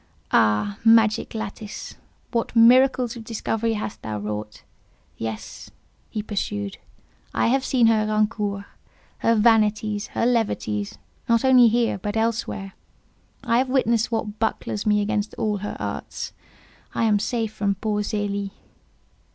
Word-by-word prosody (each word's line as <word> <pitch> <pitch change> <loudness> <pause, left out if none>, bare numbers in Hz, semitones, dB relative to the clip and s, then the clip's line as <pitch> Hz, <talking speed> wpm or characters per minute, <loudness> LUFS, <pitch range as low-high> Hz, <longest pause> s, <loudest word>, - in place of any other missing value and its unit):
Ah, 105 -2 +2
magic 225 -1 +4
lattice! 215 -1 -6 0.4
what 235 -1 -2
miracles 250 +1 +5
of 230 - -8
discovery 225 0 -1
hast 210 -1 -5
thou 110 -1 -4
wrought! 105 +1 -5 0.5
Yes," 110 -1 -6 0.4
he 215 - -4
pursued, 100 - -3 0.6
"I - - +2
have 265 +2 +2
seen 250 -4 +3
her 220 -1 +3
rancours, 210 -2 0 0.6
her 230 - +3
vanities, 215 -1 +2
her - - +2
levities—not 225 - -1
only 255 -2 +7
here, 230 -3 +1
but 205 +3 -3
elsewhere: 220 -3 -2 0.7
I 235 -2 +2
have 260 0 0
witnessed 235 -3 +2
what 220 -2 -3
bucklers 220 -1 -2
me 210 0 +3
against 210 0 -2
all 210 -1 -1
her 205 +1 -5
arts: - - -5 0.6
I - - +1
am 215 -2 +3
safe 225 0 -2
from 200 -2 0
poor 210 +1 -1
Zélie." 200 -1 -2
215 Hz, 130 wpm, -23 LUFS, 205-230 Hz, 0.7 s, only